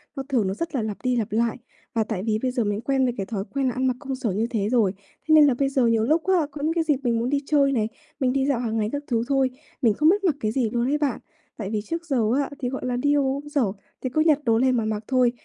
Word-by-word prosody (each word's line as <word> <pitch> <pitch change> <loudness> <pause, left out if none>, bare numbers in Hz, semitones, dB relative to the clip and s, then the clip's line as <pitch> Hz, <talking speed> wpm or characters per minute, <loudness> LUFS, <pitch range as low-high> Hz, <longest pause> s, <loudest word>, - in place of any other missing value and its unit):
nó 270 - -3
thường 230 -8 +1
nó 190 - -1
rất 330 +8 -4
là 250 - +1
lặp 215 -2 -3
đi 255 -1 +1
lặp 220 -4 -1
lại. 230 +1 +1 0.4
Và 225 - +2
tại 210 -4 -4
vì 215 -1 0
bây 255 - 0
giờ 245 -2 0
mình 205 +1 -1
quen 270 +2 +1
với 245 - 0
cái 195 - -2
thói 200 -1 -3
quen 275 -1 0
là 250 - 0
ăn 260 +1 -1
mặc 255 - +1
công 270 -2 -4
sở 255 -5 -2
như 215 +5 0
thế 215 -4 -1
rồi, 220 -6 +2 0.3
thế 315 - +4
nên 300 -1 +8
là 270 - +3
bây 270 +3 0
giờ 265 -3 +2
nhiều 225 -1 +2
lúc 315 +7 +2
á, 350 -6 +3
có 285 0 -7
những 315 +2 +1
cái 335 -1 +1
dịp 300 -4 +2
mình 235 -2 +1
muốn 240 +2 -1
đi 285 - +1
chơi 280 -2 +3
này, 220 -5 +1 0.3
mình 255 -3 +1
đi 270 0 +1
dạo 275 -4 +1
hàng 225 -2 -2
ngày 210 -1 0
các 285 0 -3
thứ 230 -2 +1
thôi, 270 -2 +2 0.3
mình 230 -5 +4
không 305 +9 +4
biết 400 +3 +2
mặc 340 -7 +2
cái 215 -4 -1
gì 235 -1 0
luôn 235 +2 0
ấy 290 +2 +1
bạn. 290 -4 -1 0.4
Tại 200 -4 -4
vì 215 -1 -1
trước 335 +10 -5
giờ 280 -5 0 0.2
á, 280 - -1
thì 250 - -2
gọi 265 0 -5
là 250 -1 -1
đi 285 +3 +2
v - - +4
công 280 +2 -1
sở, 290 -3 +1 0.4
thì 255 - -2
cứ 310 +5 +1
nhặt 310 -2 +4
đồ 230 -4 +3
lên 255 +1 +3
mà 225 - 0
mặc 215 0 -2
thôi. 255 -2 +3
255 Hz, 320 wpm, -24 LUFS, 225-280 Hz, 0.4 s, nên